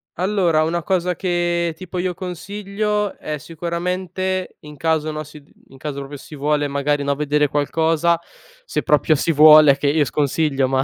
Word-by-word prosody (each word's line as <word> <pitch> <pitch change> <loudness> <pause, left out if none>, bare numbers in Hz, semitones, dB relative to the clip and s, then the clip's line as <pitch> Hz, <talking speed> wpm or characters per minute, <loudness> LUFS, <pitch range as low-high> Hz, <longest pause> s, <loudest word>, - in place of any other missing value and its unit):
Allora 180 -4 +1
una 170 +2 -1
cosa 180 0 0
che, 175 -2 -1
tipo, 180 +1 -6
io 180 0 -2
consiglio 200 +3 -3
è 155 0 -4
sicuramente 180 +4 -3
in 150 0 -11
caso, 155 +1 0
no, 155 0 -5
si 150 0 -13
di - - -27
in 135 - -16
caso 140 0 -5
proprio 140 +1 -7
si 150 - -12
vuole, 145 +1 0
e - - 0
magari, 140 +1 -1
no, 140 0 +1
vedere 150 +1 +1
qualcosa, 160 +3 +1 0.5
se - - -2
proprio 150 +1 +3
si 155 +3 +1
vuole, 150 -2 +7
che 145 - -1
io 150 +1 +3
sconsiglio 140 0 0
ma 130 0 +1
160 Hz, 175 wpm, -20 LUFS, 145-180 Hz, 0.5 s, vuole